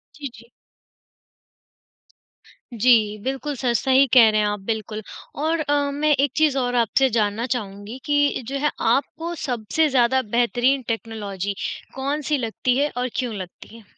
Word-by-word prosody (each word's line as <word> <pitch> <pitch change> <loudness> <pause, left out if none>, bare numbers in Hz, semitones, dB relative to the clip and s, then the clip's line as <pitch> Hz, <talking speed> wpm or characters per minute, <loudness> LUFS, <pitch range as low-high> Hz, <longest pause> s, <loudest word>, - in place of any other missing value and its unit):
जी, 290 -2 -6
जी। 235 +1 -17 2.2
जी, 220 -2 +3
बिल्कुल 270 +3 -3
सर 245 -1 0
सही 265 +2 +4
कह 235 -4 +8
रहे 215 0 +2
हैं 210 - +1
आप 205 0 -2
बिल्कुल। 220 -1 -3 0.4
और 325 +1 +1
अ, 295 -1 0 0.2
मैं 300 +2 +1
एक 280 -1 +1
चीज़ 310 -3 +2
और 245 -1 0
आपसे 245 +3 +3
जानना 210 +2 0
चाहूँगी 205 +1 -7
कि 290 -2 +2
जो 275 - -3
है, 295 +1 +1
आपको 300 +8 0
सबसे 250 +5 0
ज़्यादा 260 0 +3 0.2
बेहतरीन 245 +3 +2
टेक्नोलॉजी 205 -4 -4 0.4
कौन-सी 285 +2 -1
लगती 245 +1 -1
है 290 +2 +2
और 250 +1 -1
क्यों 245 -3 -2
लगती 185 +3 -9
है? 230 - -15
250 Hz, 150 wpm, -22 LUFS, 220-280 Hz, 2.2 s, कह